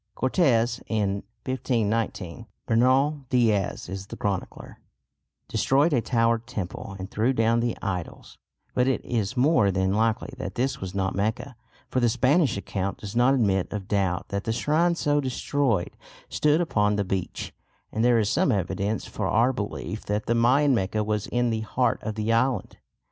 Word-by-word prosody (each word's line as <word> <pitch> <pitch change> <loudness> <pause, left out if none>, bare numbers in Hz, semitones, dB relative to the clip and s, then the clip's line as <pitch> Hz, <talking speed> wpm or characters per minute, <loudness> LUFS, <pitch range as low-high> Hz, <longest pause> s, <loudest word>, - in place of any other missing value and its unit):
Cortes, 125 -5 +2
in 100 -3 0 0.2
1519 115 -5 -2 0.2
(Bernal 130 +5 +2
Dias 110 -7 +1
is 95 +1 -6
the - - -8
chronicler), 100 -3 -4 0.7
destroyed 145 +4 +2
a 125 - +3
towered 115 -1 +1
temple, 100 -3 -5
and 95 +1 -7
threw 115 +5 +1
down 115 -1 +2
the 120 -1 -1
idols; 90 -4 -5 0.3
but 125 0 +2
it 135 - 0
is 115 0 -2
more 130 -6 +4
than 95 0 +1
likely 115 +5 0
that - - -5
this 135 +2 -1
was 95 0 -5
not 95 -1 0
Mecca, 110 +6 -2 0.4
for 130 - +1
the 120 -1 +3
Spanish 130 - +2
account 100 -1 -3
does 105 +1 -8
not 125 +3 +4
admit 95 -7 +1
of 100 -3 -5
doubt 95 -2 0
that 100 0 -3
the 115 - 0
shrines 165 +8 +1
so 145 0 +2
destroyed 130 -6 -1 0.3
stood 150 +2 +2
upon 105 -11 +1
the 100 - 0
beach, 95 -1 -4 0.4
and 110 - -1
there 120 -1 +5
is 110 -2 +2
some 165 - +2
evidence 100 +3 -1
for 105 - -3
our 120 +6 +3
belief 105 -1 -5
that 105 +1 -1
the 120 - +1
Mayan 130 +5 +4
Mecca 105 -1 0
was 105 -1 -2
in 120 -1 0
the 110 - -1
heart 125 +3 0
of 110 -1 -4
the 110 +1 0
island. 130 +3 0
115 Hz, 170 wpm, -25 LUFS, 100-130 Hz, 0.7 s, there